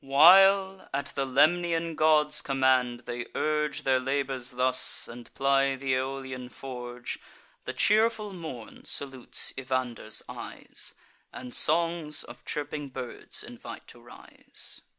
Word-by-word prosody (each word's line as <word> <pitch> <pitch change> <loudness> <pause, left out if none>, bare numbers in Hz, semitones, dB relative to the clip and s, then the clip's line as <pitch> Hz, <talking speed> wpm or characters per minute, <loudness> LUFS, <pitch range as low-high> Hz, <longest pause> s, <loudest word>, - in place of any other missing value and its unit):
While, 190 +7 +6
at 140 0 -2
the 135 -1 -1
Lemnian 165 +4 +2
god's 155 -1 +4
command, 130 -3 +2
they 120 0 -5
urge 150 -1 0
Their 130 -1 +3
labours 135 -1 -2
thus, 130 0 +2
and 120 0 -11
ply 135 0 +3
th' 135 - -12
Aeolian 130 -1 -2
forge, 125 -2 -7 0.5
The - - -3
cheerful 215 -1 +2
morn 155 -11 -8
salutes 135 -3 -2
Evander's 125 -4 -2
eyes, - - -7 0.4
And 125 - -8
songs 165 -1 +1
of - - -12
chirping 145 -1 -4
birds 130 -2 -4
invite - - -10
to - - -14
rise. - - -9
135 Hz, 120 wpm, -28 LUFS, 130-155 Hz, 0.5 s, While